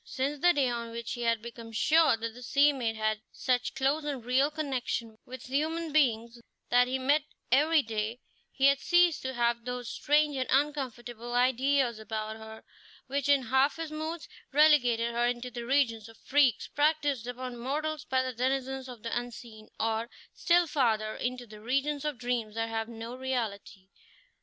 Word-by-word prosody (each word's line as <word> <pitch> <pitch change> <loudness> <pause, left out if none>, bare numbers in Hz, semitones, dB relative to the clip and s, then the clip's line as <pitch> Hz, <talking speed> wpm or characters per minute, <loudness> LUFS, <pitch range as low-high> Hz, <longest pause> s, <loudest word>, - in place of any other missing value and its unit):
Since 280 +2 -3
the 355 - +6
day 280 -6 +2
on 235 -1 -3
which 230 0 -5
he 240 - -6
had 230 -1 +1
become 230 -1 -9
sure 305 +4 +4
that 225 0 -4
the 250 - -12
sea 280 +4 +4
maid 235 -5 -2
had 215 0 -1
such 250 -1 -1
close 275 +3 +1
and 275 -5 -4
real 260 +3 +3
connection 255 -7 -3
with 255 +1 -9
human 315 +4 -2
beings 235 -5 +1 0.3
that 245 0 +5
he 260 +1 -1
met 280 +4 +2 0.3
every 300 +3 +4
day, 220 +1 -3 0.3
he 270 - +1
had 275 0 +5
ceased 350 -2 +3
to 260 0 -4
have 235 0 +1
those 245 -1 -5
strange 295 0 +2
and 255 - -1
uncomfortable 245 -4 -1
ideas 255 -1 +2
about 220 0 -4
her, 220 0 -11 0.4
which, 280 +1 -2
in 280 -2 +4
half 265 +4 +2
his 330 -1 -5
moods, 315 +2 -5 0.2
relegated 250 -6 +4
her 240 +1 +1
into 245 +1 -3
the 235 -1 -6
region 255 -5 +2
of 225 - -16
freaks 270 -5 +2
practised 290 -5 +1
upon 250 0 -5
mortals 300 +5 -3
by 260 -3 +1
the 255 0 -3
denizens 265 +2 -2
of 240 -4 -10
the 230 - -3
unseen, 235 -2 -7
or, 225 +1 -1 0.2
still 350 0 +3
farther, 225 -8 0
into 250 0 -3
the 215 -2 -13
region 275 +5 0
of 300 -3 -2
dreams 235 -3 -2
that 225 0 -1
have 225 0 -3
no 230 +1 -7
reality. 225 -7 -4
250 Hz, 175 wpm, -29 LUFS, 230-285 Hz, 0.4 s, the